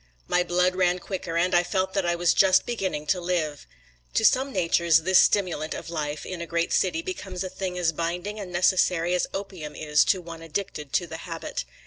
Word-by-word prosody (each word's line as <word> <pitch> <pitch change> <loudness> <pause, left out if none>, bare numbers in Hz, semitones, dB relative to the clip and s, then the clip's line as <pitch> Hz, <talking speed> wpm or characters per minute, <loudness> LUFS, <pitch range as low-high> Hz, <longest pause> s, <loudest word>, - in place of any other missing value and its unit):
My 180 - +2
blood 180 +1 +1
ran 180 -1 +2
quicker 180 -3 -4
and 180 +2 +1
I 175 - +6
felt 190 +1 -1
that 195 -3 0
I 175 - +1
was 175 -1 +2
just 190 -1 +4
beginning 190 -10 -3
to 180 +3 0
live. 165 -5 -2 0.5
To 220 - +3
some 265 +4 +3
natures 170 -4 +3
this 185 +1 +5
stimulant 175 -6 +2
of 165 - -7
life 150 -2 -3
in 180 -2 -6
a 170 - -5
great 170 0 -1
city 320 - +1
becomes 195 - -5
a 185 - -4
thing 185 -1 -4
as 175 -2 +2
binding 175 +6 -3
and 190 -3 -7
necessary 180 -1 +2
as 180 - +1
opium 185 -6 -6
is 150 -1 +3
to 190 - +2
one 165 -2 -9
addicted 165 -3 -5
to 175 - +2
the 160 -1 -7
habit. 165 0 -5
180 Hz, 205 wpm, -25 LUFS, 165-185 Hz, 0.5 s, I